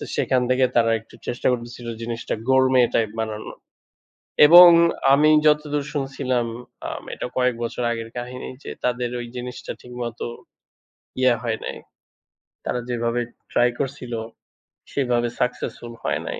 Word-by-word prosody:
সেখান 130 -1 +1
থেকে 130 0 +4
তারা 115 -1 +4
একটু 110 - -18
চেষ্টা 120 - -1
করতেছিল 120 0 -5
জিনিসটা 115 0 -3
Gourmet 130 -2 +5
টাইপ 110 -2 +2
বানানোর। 110 -1 -4 0.9
এবং 175 +3 +11 0.5
আমি 150 +2 +5 0.2
যতদূর 150 -1 +1
শুনছিলাম 135 -4 -1 0.4
আ - - -3 0.2
এটা - - -5
কয়েক 125 -1 +2
বছর 120 +1 -3
আগের 115 -1 -4
কাহিনী 125 +1 -6
যে, - - -6
তাদের 125 0 0
ওই 120 - -5
জিনিসটা 125 0 -6
ঠিকমতো 120 -1 -6 1.0
ইয়া 130 -1 +5
হয় 110 -2 -1
নাই। - - -5 0.9
তারা 125 - -1
যেভাবে 120 0 -1 0.3
ট্রাই 120 - +4
করছিল 130 -3 -4 0.8
সেভাবে 120 -3 0
সাক্সেস্ফুল 120 -1 -3
হয় - - -1
নাই। - - -4
125 Hz, 130 wpm, -23 LUFS, 120-130 Hz, 1.0 s, এবং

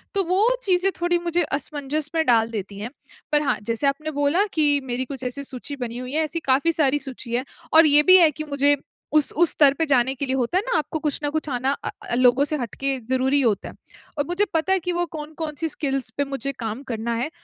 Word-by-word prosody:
तो 395 - +3
वो 365 +3 +1 0.2
चीज़ें 375 -1 +2
थोड़ी 350 0 +2
मुझे 345 0 0
असमंजस 290 +1 -3
में 320 -1 +2
डाल 230 -2 +3
देती 200 -2 -6
हैं। 215 +3 -5 0.4
पर 295 - +4
हाँ, 285 - 0
जैसे 230 +6 -1
आपने 305 +3 -2
बोला 305 +8 +2
कि 310 -2 +3 0.2
मेरी 250 0 -2
कुछ 265 0 -8
ऐसी 255 +3 -4
सूची 270 +1 -7
बनी 235 0 -7
हुई 255 +1 -7
है, 315 +1 +1
ऐसी 335 +2 -4
काफ़ी 280 +6 +3
सारी 290 -2 +2
सूची 260 -3 -8
है 255 +2 -1 0.3
और 320 +1 +8
ये 295 0 +6
भी 370 - +11
है 340 -3 +6
कि 310 +2 -6
मुझे 285 0 +3 0.4
उस 305 -2 +4
उस 340 +2 +4
स्तर 285 -3 +5
पे 325 +3 -1
जाने 265 -3 +2
के 280 - -3
लिए, 260 0 -1
होता 255 +7 0
है 385 - +1
ना, 475 - +3
आपको 315 +1 -3
कुछ 300 -1 -2
न 290 - 0
कुछ 315 0 -3
आना 260 +1 0
अ - - -2 0.2
अ, - - +2
लोगों 250 +2 +4
से 305 +1 -2
हट 240 -5 -6
के 275 -1 0
ज़रूरी 260 +4 +1
होता 220 -6 0
है। - - -13 0.4
और 290 - 0
मुझे 360 +4 +1
पता 325 +4 +1
है 385 - +2
कि 360 +1 -3
वो - - +1
कौन-कौन-सी 310 +1 -5
स्किल्स 275 -3 -2
पे 285 - +2
मुझे 275 0 -3
काम 225 +3 -5
करना 230 +1 -3
है, 245 +6 -2
285 Hz, 245 wpm, -23 LUFS, 255-315 Hz, 0.4 s, भी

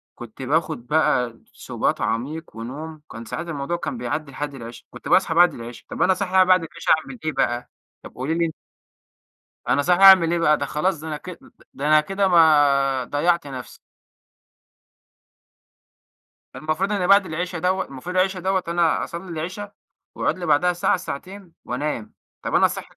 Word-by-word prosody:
كنت 120 +2 -11
باخد 150 -2 -1
بقى 125 -6 +1
سُبات - - -2
عميق 135 +4 -3
ونوم، 150 +7 -7
كان 115 +1 -8
ساعات 170 +9 -5
الموضوع 165 +2 -3
كان 240 - -4
بيعدي 155 -10 -4
لحد 145 +1 -5
العِشا. 115 -1 -10
كنت 125 - -11
باصحي 185 -3 +3
بعد 175 +2 +5
العِشا، 115 0 -10
طب - - -5
أنا 190 - +4
صاحي 185 -1 +2
بعد 185 -2 +4
العِشا 165 +1 -3
أعمل 240 +9 -11
إيه 155 - +1
بقى 120 -3 -1 0.3
طب - - -12
قولي 135 +5 -2
لي 170 0 +1
أن 160 - -3 1.2
أنا 145 - +2
صاحي 180 +4 +2
أعمل 185 -4 +8
إيه 175 - +1
بقى؟ 150 -2 +3
ده - - -2
خلاص 165 +2 -1
ده 160 - -8
أنا 150 -1 -3
ك 185 - -11
أ - - -5
أ 270 +5 -19 0.2
ده 145 +2 -3
أنا 155 0 +6
كده 195 +4 0
ما 145 -6 +4
ضيعت 165 +5 0
نفسي. 130 -3 -8 2.8
ده - - -8
المفروض 155 +6 -1
إن 185 -3 0
بعد 200 0 +6
العِشا 175 +1 -4
دوّة 185 +2 0
المفروض 140 +7 -8
العِشا 185 0 +1
دوّة 190 0 0
أنا 170 -1 +1
أصلي 175 +2 -7
العِشا 185 +6 -5 0.4
وأقعد - - -1
لي 175 - -5
بعدها 180 +5 +3
ساعة، 175 - +1
ساعتين، 185 +2 -8
وأنام. 125 -4 -4 0.3
طب - - -3
أنا - - +5
صاحي - - -8
160 Hz, 180 wpm, -22 LUFS, 140-180 Hz, 2.8 s, أعمل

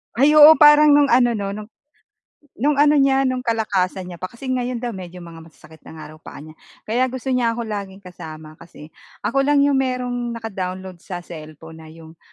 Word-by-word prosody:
Ay 280 +5 +3
oo. 305 +1 +8
Parang 295 -1 +6
nung 290 -3 +3
ano 240 -1 +3
'no, 200 -1 -4 1.1
no'ng 290 +4 +1
ano 295 +1 +3
niya, 270 0 +2
no'ng 255 -1 -2
kalakasan 190 -5 -2
niya 175 - -10
pa 185 - -5
kasi 255 +5 -9
ngayon 250 -1 -3
daw 240 - -3
medyo 180 -3 -10
mga 165 -1 -12
masasakit 160 0 -18
na - - -11
nga 155 - -10
raw 155 - -15
paa 155 - -12
niya. 155 0 -14 0.3
Kaya 245 +4 0
gusto 260 +1 -6
niya 240 -2 0
ako 235 - -5
laging 200 -2 -7
kasama 155 -3 -12
kasi 165 -2 -15 0.3
ako 275 0 0
lang 290 -1 +3
'yong 280 -1 +2
merong 245 -2 -3
naka-download 190 -4 -7
sa 175 0 -8
cellphone 160 -1 -12
na 160 - -13
'yong 160 0 -15
225 Hz, 195 wpm, -20 LUFS, 175-260 Hz, 1.1 s, oo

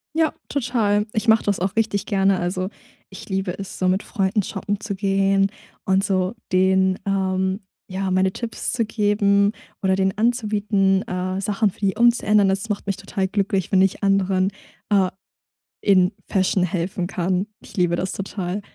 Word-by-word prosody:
Ja, 320 -1 +2
total. 230 -6 +1
Ich 215 +1 -1
mache 220 0 +5
das 205 -1 0
auch 190 +2 -2
richtig 220 -3 0
gerne. 195 -2 +2
Also, 185 +1 -2 0.4
ich 190 - -11
liebe 190 -2 -2
es, 195 -1 -7
so 185 - +1
mit 185 +2 +1
Freunden 195 -1 0
shoppen 200 +1 -3
zu 215 -2 -4
gehen 195 0 +2 0.3
und 190 0 +2
so 185 +1 0 0.2
denen, 190 0 +3
ähm, 190 0 0 0.3
ja, 190 +1 -2
meine 185 0 +2
Tipps 230 +3 -4
zu 235 -2 0
geben 205 -1 +2 0.3
oder 190 -1 +2
denen 190 0 +1
anzubieten, 210 -4 +1
äh, 185 +1 -2
Sachen 210 +1 +1
für - - -22
die 200 -1 0
umzuändern. 215 -4 +4
Das 195 +4 -1
macht 205 -1 -2
mich 195 -1 -1
total 195 -1 -2
glücklich, 195 -1 -1
wenn 190 -2 +5
ich 190 +1 +1
anderen, 195 -1 +2 0.4
äh, 195 -2 +4 0.7
in 185 -2 +4 0.2
Fashion 190 -1 +1
helfen 180 0 -2
kann. 180 +2 -1
Ich - - -14
liebe 175 -2 +2
das 185 +2 -2
total. 195 0 -4
195 Hz, 165 wpm, -22 LUFS, 190-205 Hz, 0.7 s, mache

